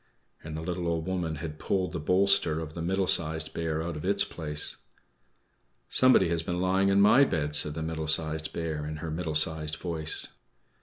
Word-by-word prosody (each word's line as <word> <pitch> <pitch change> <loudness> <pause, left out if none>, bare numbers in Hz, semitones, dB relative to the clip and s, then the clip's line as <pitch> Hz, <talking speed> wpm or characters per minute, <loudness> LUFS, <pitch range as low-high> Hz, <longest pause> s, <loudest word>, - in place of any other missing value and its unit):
And 80 0 -6
the 80 - -5
little 90 0 -3
Old 85 -1 -1
Woman 90 -4 -2
had 75 0 -7
pulled 95 -2 -1
the 85 - -4
bolster 90 -1 +2
of 80 -1 -7
the 85 - -6
Middle 95 +3 0
Sized 80 -2 -1
Bear 80 -1 -2
out 85 -1 -4
of 75 - -7
its 100 +2 +3
place. 75 -2 -2 1.1
"=Somebody 130 -9 +4
has 85 -1 0
been 90 +1 -3
lying 95 +1 +2
in 100 0 +3
my 105 +7 +6
bed!=" 75 - -1
said 75 +1 +3
the 80 - -4
Middle 80 -1 -4
Sized 80 0 0
Bear, 80 -3 -4
in 75 - -5
her 80 +1 -6
middle 80 -1 -3
sized 80 0 +1
voice. 80 -3 0
80 Hz, 195 wpm, -28 LUFS, 80-90 Hz, 1.1 s, my